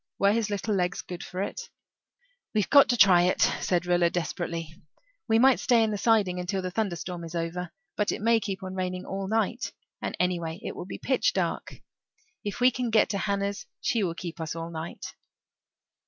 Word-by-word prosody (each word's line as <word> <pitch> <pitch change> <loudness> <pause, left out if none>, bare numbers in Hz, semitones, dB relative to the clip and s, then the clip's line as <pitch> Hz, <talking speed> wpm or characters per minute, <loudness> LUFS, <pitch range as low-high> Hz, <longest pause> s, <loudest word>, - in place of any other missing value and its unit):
Were 200 0 +4
his 220 -1 0
little 205 +1 -1
legs 180 -1 0
good 180 -1 -7
for 185 +1 -4
it? 470 - -6 0.9
"We've 210 -3 +1
got 280 -1 +8
to 245 - +2
try 185 -5 +7
it," 180 - +1 0.2
said 180 -1 +1
Rilla 175 -1 +3
desperately. 165 -1 -4 0.5
"We 225 -1 +4
might 260 +2 +5
stay 240 -3 +4
in 220 - +1
the 205 - -1
siding 205 -6 +3
until 185 +1 -2
the 185 - -3
thunderstorm 180 -4 -3
is 165 +1 -7
over; 170 +1 -3 0.2
but 210 - +1
it - - -3
may 230 +1 +3
keep 195 -2 -4
on 185 0 -5
raining 185 0 -3
all 195 0 -4
night 225 +3 -1 0.3
and - - -4
anyway 175 -2 -1
it - - -5
will - - -7
be - - -6
pitch - - +1
dark. - - -2 0.7
If 205 +2 -4
we 250 +1 +6
can 250 -1 -2
get 220 -1 +4
to 200 - -1
Hannah's 200 0 -2
she 230 - 0
will 170 -3 -1
keep 170 -1 -6
us 160 0 -3
all 165 0 -5
night." 160 +1 -6
190 Hz, 200 wpm, -27 LUFS, 175-215 Hz, 0.9 s, got